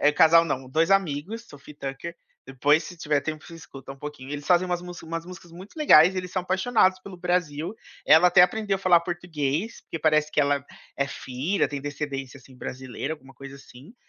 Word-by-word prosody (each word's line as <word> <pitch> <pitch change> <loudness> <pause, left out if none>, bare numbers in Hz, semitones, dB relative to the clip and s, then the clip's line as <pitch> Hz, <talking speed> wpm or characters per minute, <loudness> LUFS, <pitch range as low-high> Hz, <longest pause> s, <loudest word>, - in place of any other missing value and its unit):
eh, 145 - +5
casal 165 +2 +6
não, 130 -5 -3
2 160 +7 +1
amigos, 195 +4 0
Sophie 145 +1 -14
e - - -11
Tucker. 140 +6 -6 0.3
Depois 145 +4 +2
se 180 - -10
tiver 150 -3 0
tempo 155 +1 -5
você 170 - -11
escuta 135 -4 -11
um 135 - -16
pouquinho, 145 -2 -8
eles 145 0 -6
fazem 180 0 +3
umas 175 -1 -2
mus 175 -1 -9
umas 165 0 -5
músicas 175 -2 -12
muito 190 - -13
legais 180 - +6
e 185 - -2
eles 180 0 -6
são 185 - -1
apaixonados 190 0 +2
pelo 190 -1 -10
Brasil. 175 0 -2 0.3
Ela 160 +3 +7
até 180 0 +6
aprendeu 200 +2 +1
a - - -9
falar 180 -3 +4
português, 170 +2 -3
porque 165 - -7
parece 155 -1 +2
que - - +2
ela 140 -1 +1 0.3
é 140 - 0
filha, 145 +8 -2
tem 145 -1 -5
descendência, 140 -2 -5
assim, 130 0 -18
brasileira, 130 +4 -5
alguma 135 -3 -18
coisa 140 +1 -10
assim. 140 - -15
160 Hz, 210 wpm, -25 LUFS, 140-180 Hz, 0.3 s, Ela